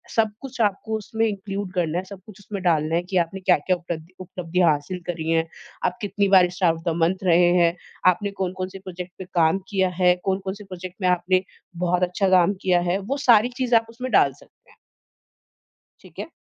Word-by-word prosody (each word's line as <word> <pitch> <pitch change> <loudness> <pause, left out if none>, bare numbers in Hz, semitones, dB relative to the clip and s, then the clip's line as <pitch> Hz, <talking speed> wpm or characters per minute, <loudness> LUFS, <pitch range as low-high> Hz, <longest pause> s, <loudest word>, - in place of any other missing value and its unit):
सब 220 -2 +2
कुछ 265 -3 -9
आपको 215 +1 0
उसमें 225 +1 -2
इंक्लूड 200 -2 -4
करना 170 -2 -1
है। 185 - -2
सब 195 -1 -11
कुछ 210 -2 -13
उसमें 200 -1 -7
डालना 160 -2 +2
है 170 - +1
कि 190 - 0
आपने 175 +2 0
क्या-क्या 185 -1 +2
उपलब्धि 170 0 -7
उपलब्धियाँ 180 -1 0
हासिल 150 +5 -3
करी 165 -2 -3
हैं। 165 0 +1 0.4
आप - - -1
कितनी 200 -1 0
बार 185 -2 +6
स्टार 175 -2 +2
ऑफ़ 165 +1 -3
मंथ 180 +3 +1
रहे 175 -1 +5
हैं? 170 -1 +3 0.3
आपने 200 +3 -1
कौन-कौन 185 -1 -4
से 195 0 -10
प्रोजेक्ट 180 -1 -8
पे 190 - -6
काम 165 +2 +3
किया 190 -2 +1
है। 180 0 +5
कौन-कौन 190 0 -1
से 210 - -11
प्रोजेक्ट 185 -1 -8
में 185 - +2
आपने 180 +1 +2 0.4
बहुत 180 +1 +1
अच्छा 180 +2 +1
काम 185 +1 +4
किया 180 -2 +3
है? 190 - +1
वो 240 +9 -3
सारी 235 0 +6
चीज़ें 245 -3 +3
उसमें 250 +2 -6
डाल 140 -8 +4
सकते - - -23
हैं। - - -23 1.2
ठीक - - -18
है। - - -4
185 Hz, 200 wpm, -23 LUFS, 175-200 Hz, 1.2 s, बार